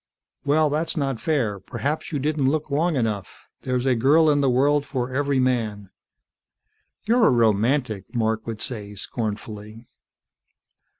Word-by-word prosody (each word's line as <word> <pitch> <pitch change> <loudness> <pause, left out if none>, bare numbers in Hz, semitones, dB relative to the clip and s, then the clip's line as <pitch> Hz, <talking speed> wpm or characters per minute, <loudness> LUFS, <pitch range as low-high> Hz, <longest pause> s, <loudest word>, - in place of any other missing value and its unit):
"Well, 150 +1 +2
that's 160 +3 -1
not 135 -5 -1
fair. 120 -11 0
Perhaps 140 - -4
you 150 - -1
didn't 145 -1 +1
look 155 0 -2
long 160 +3 +1
enough. 110 -7 -3 0.2
There's 125 -1 -1
a 130 - +3
girl 150 +7 +4
in 145 -1 +2
the 135 - +3
world 140 +3 +3
for 130 -3 -3
every 140 0 +1
man." 110 -6 -1 1.1
"You're 230 0 +4
a - - +5
romantic!" 115 -1 +1
Mark 110 -1 0
would 110 -2 -4
say 105 -4 -6
scornfully. 110 +1 -6
130 Hz, 140 wpm, -23 LUFS, 110-145 Hz, 1.1 s, a